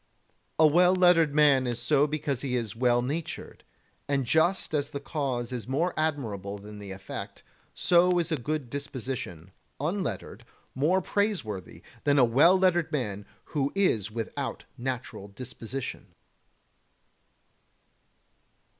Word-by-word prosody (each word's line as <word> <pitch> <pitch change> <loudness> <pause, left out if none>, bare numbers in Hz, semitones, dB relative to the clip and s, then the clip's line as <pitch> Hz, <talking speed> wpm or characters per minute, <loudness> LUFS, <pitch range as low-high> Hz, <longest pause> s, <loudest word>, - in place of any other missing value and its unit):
28. 155 - +7
A 150 - 0
well 180 +2 +5
lettered 170 -5 +4
man 140 -4 +5
is 120 -1 -2
so 145 -1 +3
because 145 -4 -2
he 130 -3 -2
is 115 -4 -3
well 120 0 +2
natured, 150 +6 -5 0.4
and 140 -2 0
just 160 +7 +2
as 145 -1 0
the 145 - -5
cause 135 -4 -3
is 120 -4 -5
more 160 +7 0
admirable 110 -11 -2
than 105 +1 -10
the 100 -1 -8
effect, 95 0 -7 0.3
so 180 0 +4
is 170 0 0
a - - +3
good 150 +1 -3
disposition, 130 - -5 0.3
unlettered, 155 - -3 0.3
more 165 +8 +2
praiseworthy 170 - -2 0.2
than 145 0 +3
a 130 - +7
well 150 +11 +5
lettered 175 -4 +2
man 105 -9 -3 0.2
who 140 -2 -1
is 115 - +2
without 115 0 -4
natural 125 -5 -5
disposition. 125 +3 -7
140 Hz, 130 wpm, -28 LUFS, 120-160 Hz, 0.4 s, 28